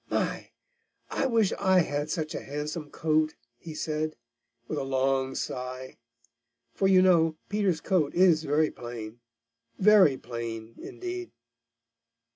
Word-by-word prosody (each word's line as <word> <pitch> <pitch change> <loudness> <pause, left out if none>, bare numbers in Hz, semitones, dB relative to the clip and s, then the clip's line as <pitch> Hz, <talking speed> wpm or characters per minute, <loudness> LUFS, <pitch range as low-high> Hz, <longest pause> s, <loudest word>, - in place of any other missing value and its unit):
"My! - - -2 0.6
I 270 - 0
wish 225 -5 +2
I 190 -1 +4
had 145 -1 -2
such 155 -2 -2
a - - -4
handsome 150 +2 -5
coat," 155 0 +1 0.2
he 160 +2 -9
said, 155 0 -2 0.5
with 155 - -2
a - - -2
long 135 0 0
sigh, 130 0 -5 0.7
for 195 - +1
you 185 -1 +6
know 165 -4 +4
Peter's 200 -6 0
coat 165 -7 +1
is 175 -3 +5
very 155 +1 +2
plain, 120 -1 -8 0.6
very 195 -9 +6
plain, 115 -2 -6
indeed. 365 0 -6
155 Hz, 125 wpm, -28 LUFS, 135-185 Hz, 0.7 s, you